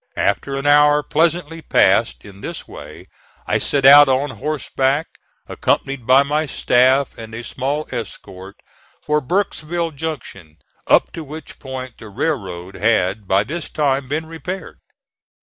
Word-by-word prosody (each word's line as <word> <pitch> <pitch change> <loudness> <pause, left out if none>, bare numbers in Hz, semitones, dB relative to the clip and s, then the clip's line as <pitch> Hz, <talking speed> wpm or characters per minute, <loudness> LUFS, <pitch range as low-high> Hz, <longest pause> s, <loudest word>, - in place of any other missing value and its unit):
After 120 +7 0
an 135 - -5
hour 145 0 +5
pleasantly 165 +1 0
passed 60 - +2
in 100 -1 -13
this - - -6
way - - -11 0.4
I - - 0
set 140 -2 0
out 145 +1 +9
on 135 +2 +1
horseback, 145 0 -2 0.3
accompanied 135 -4 -2
by 130 +2 +6
my 150 +2 -1
staff 130 +2 +2
and 110 0 -8
a 115 - -6
small 140 +5 -3
escort, 100 -5 -7 0.5
for 150 0 +1
Burkesville 170 0 -2
Junction, 135 - -7 0.3
up - - +4
to 165 - -7
which 155 +2 -10
point 130 -2 -8
the 110 - -10
railroad 95 - -3
had 105 -1 0
by 95 +2 +3
this 155 +8 -6
time 140 -3 0
been 155 +4 -2
repaired. 180 +4 -7
140 Hz, 140 wpm, -19 LUFS, 115-155 Hz, 0.5 s, out